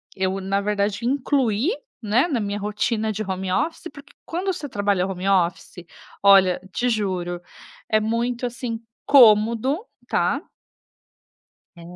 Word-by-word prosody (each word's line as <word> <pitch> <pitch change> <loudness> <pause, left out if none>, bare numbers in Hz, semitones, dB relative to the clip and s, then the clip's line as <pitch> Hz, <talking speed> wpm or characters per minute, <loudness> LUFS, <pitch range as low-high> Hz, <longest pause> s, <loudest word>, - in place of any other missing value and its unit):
eu 190 0 -1
na 195 +1 0
verdade 205 +2 -1
incluí, 260 - +1 0.3
né, 225 +7 +2
na 280 -8 -1
minha 205 -1 -3
rotina 215 +2 -1
de 215 +1 -4
home 190 -1 -3
office 320 - -1
porque 280 0 -14
quando 365 +3 -2
você 300 -4 -6
trabalha 200 -4 0
home 190 0 -4
office, 175 -1 0 0.4
olha, 195 -2 +6
te 245 - 0
juro, 185 -6 -2 0.5
é 215 - +3
muito, 235 +3 -1
assim, 240 -1 -5 0.3
cômodo, 235 - +5 0.2
tá - - +1 1.4
É - - -12
215 Hz, 130 wpm, -23 LUFS, 195-245 Hz, 1.4 s, olha